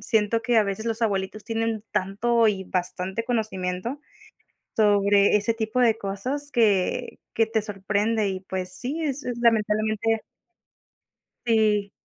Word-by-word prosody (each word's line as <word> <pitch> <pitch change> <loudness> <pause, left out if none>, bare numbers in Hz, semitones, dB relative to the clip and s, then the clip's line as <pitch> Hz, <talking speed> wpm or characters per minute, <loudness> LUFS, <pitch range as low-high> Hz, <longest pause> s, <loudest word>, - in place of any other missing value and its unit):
siento 220 +1 +1
que 240 -2 +3
a - - +5
veces 200 +2 -3
los 230 0 -2
abuelitos 205 -1 -1
tienen 225 -1 -2
tanto 225 +5 +1
y 190 -2 -1
bastante 185 +4 -3
conocimiento, 220 0 -2 0.8
sobre 205 -1 +4
ese 210 +2 +1
tipo 225 +2 -1
de 225 -2 +4
cosas 250 +10 -4
que 210 -7 +1
que 225 - +3
te 220 -1 0
sorprende 205 +1 -1
y 190 -1 -3
pues 185 -1 -3
sí, 285 +7 -3
es, 285 -1 -2 0.2
lamentablemente 220 0 +2 1.3
Sí. 210 -3 +2
215 Hz, 130 wpm, -25 LUFS, 200-230 Hz, 1.3 s, a